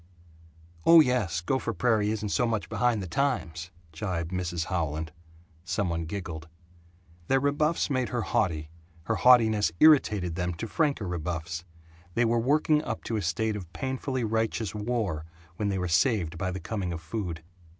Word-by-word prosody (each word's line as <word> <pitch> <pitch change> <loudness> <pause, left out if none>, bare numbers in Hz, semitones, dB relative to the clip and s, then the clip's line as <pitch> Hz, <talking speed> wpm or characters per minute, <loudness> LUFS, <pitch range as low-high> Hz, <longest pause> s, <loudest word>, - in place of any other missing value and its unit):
"Oh 165 0 +8
yes, 120 - +2
Gopher 130 +9 -1
Prairie 110 -4 +2
isn't 105 -1 -2
so 120 +4 +1
much 110 -6 -2
behind 120 -4 +1
the - - -5
times," 90 - -1 0.2
gibed 85 0 -3
Mrs. 85 -2 -2
Howland. 80 -4 -2 0.5
Some 90 +1 -1
one 85 -1 -2
giggled. 80 -3 -6 0.8
Their 135 - +3
rebuffs 145 +4 +1
made 130 -4 0
her 120 -3 -1
haughty; 80 -10 -1 0.3
her 115 +6 -1
haughtiness 110 -6 +5
irritated 105 - +5
them 90 0 -2
to 115 - -5
franker 140 - 0
rebuffs; 85 0 -4 0.5
they 120 - +3
were 115 +1 +2
working 150 +4 +2
up 115 - -4
to 115 - -3
a 105 - 0
state 110 +5 -1
of 90 -5 -7
painfully 130 +1 -2
righteous 110 -2 -1
war 105 -7 -2 0.3
when 105 -2 0
they 100 - -1
were 90 -1 -1
saved 85 0 +2
by 95 +2 -2
the 95 +1 -4
coming 100 -5 -3
of 85 - -4
food. 85 0 -5
105 Hz, 160 wpm, -28 LUFS, 85-120 Hz, 0.8 s, Oh